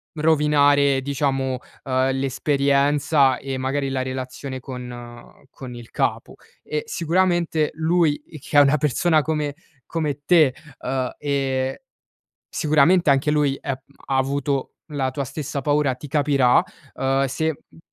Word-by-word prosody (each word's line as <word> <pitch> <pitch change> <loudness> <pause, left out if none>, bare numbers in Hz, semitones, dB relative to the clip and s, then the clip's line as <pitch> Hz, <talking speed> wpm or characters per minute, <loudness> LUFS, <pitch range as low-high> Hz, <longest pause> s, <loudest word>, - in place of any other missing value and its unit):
rovinare 145 -3 +3
diciamo, 135 -2 -1 0.3
uhm, 130 0 +1
l'esperienza 140 +1 +2
e 135 -1 -5
magari 135 +1 -1
la 135 -1 -1
relazione 130 +1 -5
con 120 -2 -9
con 125 -2 -9
il 120 -1 -11
capo. - - -2 0.3
E 150 0 -3
sicuramente 170 -2 +1
lui 160 -1 +1 0.2
che 145 - -1
è - - +10
una 140 +1 +4
persona 155 +3 +2
come 150 -2 -2 0.3
come 150 -4 -3
te, 155 -7 +5 0.3
uhm, 130 -1 -2
ehm, 135 -2 -1 0.7
sicuramente 155 +3 +3
anche 140 +2 +3
lui, 145 -2 +2
è 140 - -4
m - - -1 0.3
ha 135 - 0
avuto 140 0 -1
la 135 -4 -1
tua 140 +1 -3
stessa 140 0 -5
paura, 145 -2 +1
ti 145 +2 -10
capirà, 140 -1 +3 0.3
uhm, 135 +1 +1
se 160 +3 -2
mhmm - - -19
140 Hz, 135 wpm, -22 LUFS, 130-150 Hz, 0.7 s, è